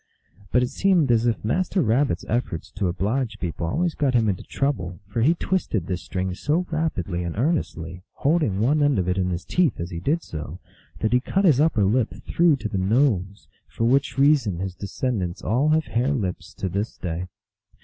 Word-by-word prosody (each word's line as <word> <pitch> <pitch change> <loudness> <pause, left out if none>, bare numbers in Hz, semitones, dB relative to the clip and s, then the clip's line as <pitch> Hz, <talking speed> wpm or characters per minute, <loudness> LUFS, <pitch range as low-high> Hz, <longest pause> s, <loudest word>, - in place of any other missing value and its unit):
But 125 +1 +4
it 125 - -2
seemed 175 -5 +3
as 115 0 +3
if 115 -2 -1
Master 185 - 0
Rabbit 130 +5 +1
s - - -10
efforts 115 -8 -2
to 95 - -1
oblige 110 +6 -1
people 85 -1 -3
always 170 - 0
got 135 -4 0
him 115 -2 +3
into 95 - -2
trouble, 95 -11 -2
for 105 +3 -3
he 155 +8 +4
twisted 170 - -1
this 90 +1 -3
string 95 0 -3
so 150 - 0
rapidty 100 - -1
and 85 +2 -4
earnestly, 90 - -1
holding 145 - +1
one 140 +8 +2
end 145 -2 +3
of 90 -2 0
it 90 +1 0
in 90 -1 0
his 90 0 -3
teeth 175 - +1
as 85 +2 -4
he 85 - -4
did 155 - 0
so, 75 +1 -7 0.4
that 110 - +1
he 125 - +5
cut 195 +9 0
his 150 -7 +5
upper 150 -10 +3
lip 105 0 +1
through 170 -3 +4
to 115 -5 -4
the 100 -3 -2
nose, 100 -2 +1 0.2
for - - -4
which 135 +5 +2
reason 135 - +3
his 95 +1 -4
descendants 100 -2 -3
all 130 +7 +2
have 155 +1 +3
hare 125 +5 0
lips 95 -9 -4
to 95 - -3
this 100 +5 -3
day. 90 0 -4
115 Hz, 200 wpm, -24 LUFS, 95-145 Hz, 0.4 s, he